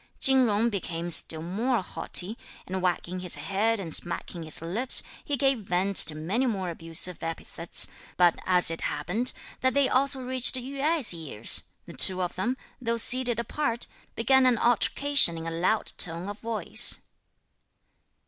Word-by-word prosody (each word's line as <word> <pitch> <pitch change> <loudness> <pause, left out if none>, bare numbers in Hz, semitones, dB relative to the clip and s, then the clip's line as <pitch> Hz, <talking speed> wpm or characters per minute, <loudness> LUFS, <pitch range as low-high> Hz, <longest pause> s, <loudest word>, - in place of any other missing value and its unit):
Chin 265 -2 +5
Jung 220 +2 0
became 175 -3 -5
still 160 -1 -1
more 220 +5 -2
haughty, 185 +3 0 0.3
and 190 0 -5
wagging 180 0 -3
his 180 -1 +1
head 215 +3 -2
and 165 -5 0
smacking 175 0 -2
his 155 -1 +5
lips, 200 +11 -1 0.2
he 290 -2 -3
gave 270 -1 0
vent 195 0 -3
to 155 - +9
many 195 +12 -2
more 190 -6 -3
abusive 165 +2 -2
epithets; 165 +1 0 0.3
but 175 -2 +2
as 180 -2 +3
it 165 - -4
happened 230 +9 -1 0.3
that 260 +1 0
they 280 -1 +3
also 270 +1 +1
reached 255 0 +2
Yü 270 +2 -6
Ai's 310 - +5
ears, 160 -10 0 0.2
the - - -12
two 185 -1 +4
of 175 - -5
them, 240 +8 -3 0.2
though 230 -1 -2
seated 240 0 0
apart, 235 0 -3 0.3
began 260 +3 +2
an 245 -2 +2
altercation 245 -3 +2
in 165 - -8
a 165 - -5
loud 180 +6 -1
tone 170 +2 +1
of 205 - -9
voice. 225 -1 +2
205 Hz, 160 wpm, -25 LUFS, 175-250 Hz, 0.3 s, to